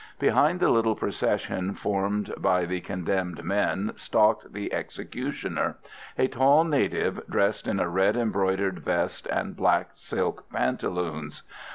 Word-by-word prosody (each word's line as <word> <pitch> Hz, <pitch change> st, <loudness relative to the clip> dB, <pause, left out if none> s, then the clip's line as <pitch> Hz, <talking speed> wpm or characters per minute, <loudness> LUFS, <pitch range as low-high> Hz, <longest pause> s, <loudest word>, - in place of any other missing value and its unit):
Behind 165 Hz, +5 st, +3 dB
the -, -, +4 dB
little 115 Hz, -1 st, +3 dB
procession 95 Hz, -1 st, -1 dB
formed 100 Hz, +1 st, -1 dB
by 90 Hz, -1 st, +2 dB
the 90 Hz, +1 st, -3 dB
condemned 90 Hz, -2 st, -2 dB
men 100 Hz, +2 st, 0 dB
stalked 105 Hz, +1 st, +2 dB
the 100 Hz, +1 st, -5 dB
executioner, -, -, -3 dB, 0.4 s
a 130 Hz, -, +3 dB
tall 135 Hz, +5 st, +5 dB
native 155 Hz, -4 st, 0 dB
dressed 100 Hz, -, +1 dB
in 100 Hz, -, 0 dB
a 90 Hz, -, +1 dB
red 95 Hz, +6 st, +2 dB
embroidered 95 Hz, -4 st, 0 dB
vest -, -, -1 dB
and -, -, -2 dB
black -, -, +2 dB
silk -, -, -3 dB
pantaloons. 80 Hz, +3 st, -2 dB
100 Hz, 130 wpm, -27 LUFS, 90-110 Hz, 0.4 s, tall